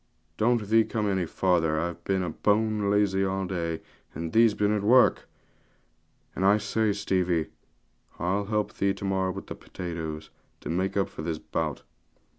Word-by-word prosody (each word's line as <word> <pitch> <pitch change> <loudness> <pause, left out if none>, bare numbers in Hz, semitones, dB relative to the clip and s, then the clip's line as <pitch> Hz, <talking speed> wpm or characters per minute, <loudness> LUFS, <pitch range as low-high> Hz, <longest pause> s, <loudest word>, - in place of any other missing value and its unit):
Don't 115 0 +1
thee 110 +2 +5
come 110 -1 -2
any 95 -3 0
farther, 80 -4 +1
I've 85 +1 -4
been 95 -2 0
bone 105 -1 +2
lazy 100 -1 +2
all 95 0 -1
day, 85 -3 -3 0.3
and 80 -1 -5
thee's 115 -1 +5
been 105 0 +1
at 105 -1 +1
work. 120 +5 +4 1.1
And 95 - -2
I 100 +2 +5
say, 105 +1 0
Stevie, 90 -5 0 0.7
I'll 95 +3 -1
help 105 0 -1
thee 100 0 0
with 95 -1 -1
the - - -6
potatoes 80 -4 -6 0.3
to - - -7
morrow, - - -1
to - - +1
make - - -5
up 100 - +2
for - - -9
this 80 0 -2
bout.' 75 -3 -3
95 Hz, 165 wpm, -27 LUFS, 85-105 Hz, 1.1 s, thee